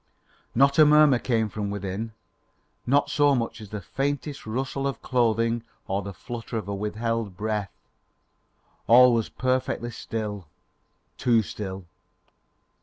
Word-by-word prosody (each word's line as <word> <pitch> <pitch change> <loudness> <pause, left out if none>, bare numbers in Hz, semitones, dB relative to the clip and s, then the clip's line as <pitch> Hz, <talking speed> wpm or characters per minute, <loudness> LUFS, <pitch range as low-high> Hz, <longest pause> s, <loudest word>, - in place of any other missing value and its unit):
Not 140 +4 +4
a 155 - +9
murmur 150 -4 +6
came 115 -4 +1
from 105 0 -4
within, 100 +2 -4 0.7
not 140 +3 +3
so 145 -1 +4
much 115 -1 -3
as 105 - -10
the 105 -1 -5
faintest 140 - -3
rustle 135 +4 -2
of 135 - -5
clothing 115 -1 +1 0.3
or 95 +1 -1
the 100 0 -6
flutter 115 +4 -6
of 105 -3 -5
a 100 - -3
withheld 105 0 -2
breath. 105 -1 -2 1.2
All 125 +2 +8
was 115 -2 0
perfectly 130 -2 -1
still 105 -5 -5 0.7
too 115 -3 +3
still. 95 -2 -6
115 Hz, 130 wpm, -26 LUFS, 105-130 Hz, 1.2 s, a